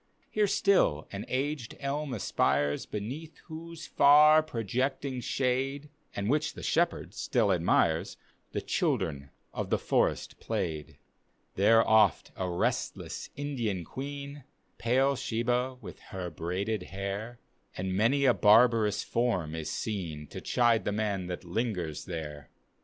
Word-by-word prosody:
Here 210 -1 +2
still 190 - +2
an 100 0 -5
aged 135 -2 -2
dm 145 +2 -2
a^ires, 75 - 0
Beneath 130 +10 -6
whose 165 0 -8
far 150 +2 +7
projecting 130 0 -2
shade, 135 +4 -1 0.3
(And 100 0 -2
which 150 +5 0
the - - -8
shepherd 170 0 0
stiU 110 -6 +1
admires,) 85 -2 +1 0.3
The - - -2
children 70 -1 -1 0.2
of - - -3
the - - +2
forest - - 0
played. 75 -2 -3 0.6
There 115 +4 +4
oft 110 -4 +4
a 95 -1 -2
restless 85 - -2
Indian 120 - -3
queen, 140 - -7 0.4
(Pale 135 +4 +2
Shebah 125 +3 -1
with - - -9
her 90 -2 -5
braided 95 +7 -2
hair,) 100 +5 -5 0.4
And 95 0 -2
many 125 +8 +3
a 125 - +6
barbarous 110 -1 +4
form 105 -10 0
is 80 -1 -4
seen 85 -7 -4
To - - -7
chide 120 -2 +2
the - - -1
man 100 -3 -1
that 90 +1 -5
lingers 90 -5 -3
there. 75 -5 -6
115 Hz, 130 wpm, -29 LUFS, 95-140 Hz, 0.6 s, far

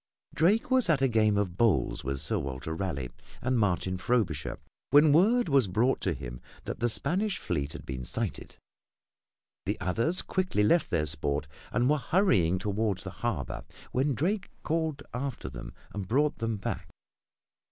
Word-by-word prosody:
Drake 200 +10 +2
was 255 -7 +4
at 145 -4 +3
a - - +5
game 110 -3 +3
of 95 -3 -1
bowls 100 - +2
with 70 0 -2
Sir - - +2
Walter 70 +3 -4
Raleigh 80 -9 -3 0.3
and 130 -1 +1
Martin 95 -2 0
Frobisher 95 -9 0 0.3
when 145 +1 +6
word 220 +9 +4
was 135 -7 +4
brought 115 +8 +1
to 95 - 0
him - - -7 0.2
that - - -5
the 120 - +2
Spanish 185 - 0
fleet 75 -3 -2
had 85 - -9
been 65 -1 -5
sighted. - - -4 1.1
The - - -1
others 115 - +1
quickly 185 - 0
left 165 +11 +3
their 80 -3 +1
sport 75 0 -1 0.3
and 125 - +2
were 150 +1 +3
hurrying 115 - +3
toward 105 0 0
the - - -6
harbor - - -3 0.3
when 135 +1 +1
Drake 190 - -1
called 160 -3 -1
after 125 - -4
them - - -8 0.2
and 100 -3 -4
brought 145 +7 +2
them 115 -1 -1
back. 100 - -4
110 Hz, 165 wpm, -29 LUFS, -, 1.1 s, when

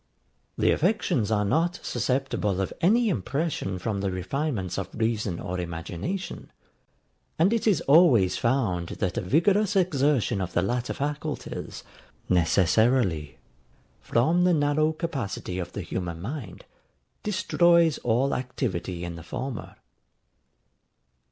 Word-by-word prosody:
The - - +3
affections 165 - +1
are 105 -2 +1
not 165 - +1
susceptible 125 -7 -1
of 95 - -2
any 225 +7 +4
impression 135 - -2
from 100 +1 -3
the 100 - 0
refinements 95 - -2
of 95 -1 -5
reason 110 -5 -1
or 90 +1 -4
imagination; 90 - -5 0.9
and 185 +7 +3
it 230 -1 0
is 200 -7 +3
always 140 - +5
found 110 -9 0
that 95 -2 -2
a - - -2
vigorous 190 - +2
exertion 145 - +2
of 90 - -4
the 90 - +2
latter 120 +4 -1
faculties, 150 +1 -4 0.4
necessarily, 90 - +2 0.6
from 160 +10 +2
the 180 -1 +4
narrow 150 +1 +2
capacity 135 - -4
of 90 - -5
the - - -4
human 85 -3 -4
mind, 110 - -7 0.6
destroys 170 -6 +3
all 125 +4 +1
activity 95 -9 -3
in 85 -1 -6
the - - -8
former. 125 +8 -6
125 Hz, 120 wpm, -26 LUFS, -, 0.9 s, always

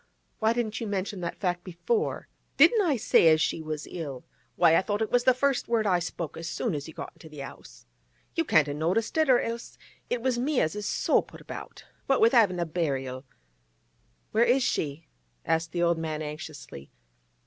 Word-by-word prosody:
Why 220 +1 +3
didn't 235 -1 -2
you 225 - -3
mention 195 -1 -3
that 175 0 -2
before?' 430 - -2 0.3
'Didn't 455 -3 +6
I 330 -8 +2
say 205 - +4
as 155 -1 +6
she 160 - 0
was 155 -1 -5
ill? 145 -7 -7 0.3
Why, 165 -2 +5
I - - +5
thought 205 +3 -1
it 220 - -4
was 245 0 +2
the 255 - +6
first 275 0 +1
word 230 -2 +1
I 185 -3 +3
spoke 170 -2 -5
as 165 +1 -5
soon 230 - -2
as 145 0 -4
you 160 - -10
got - - -7
into 160 - -14
the 150 -2 -8
'ouse. - - -12 0.5
You 330 - +1
can't 155 - +4
a 145 - -3
noticed 170 +9 -1
it, 315 -3 +3
or 250 -2 +6
else 230 0 -5 0.3
it 245 -1 -2
was 255 -2 +1
me 275 +2 +1
as 155 - 0
is 210 -1 -4
so - - +2
put - - -14
about. - - -9 0.2
What 270 - +3
with 230 - +5
havin' 205 -8 +4
a 170 - 0
burial—' 135 -6 -3 1.1
'Where 225 - +4
is 245 +2 +3
she?' 150 -4 -2 0.4
asked 165 0 0
the 175 -1 0
old 170 -1 +2
man 155 -1 -3
anxiously. 150 - -8
180 Hz, 205 wpm, -27 LUFS, 155-235 Hz, 1.1 s, Didn't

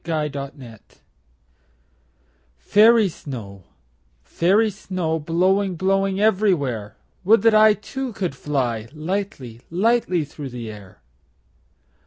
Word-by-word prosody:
Snow 155 -3 -1
Song 140 -1 -5 2.1
FAIRY 215 - +5
snow, 110 - -9 0.6
fairy 205 +6 +2
snow, 180 -5 -3
Blowing, 185 +4 +1
blowing 195 +2 0
everywhere, 155 - 0 0.3
Would 220 +5 +4
that 225 -1 +5
I 215 0 +6
Too, 265 +4 -6
could 190 -7 -3
fly 125 -6 -2
Lightly, 155 - -5
lightly 185 -3 +1
through 145 -1 -8
the 120 -3 -7
air. 100 -10 -14
175 Hz, 100 wpm, -22 LUFS, 135-205 Hz, 2.1 s, I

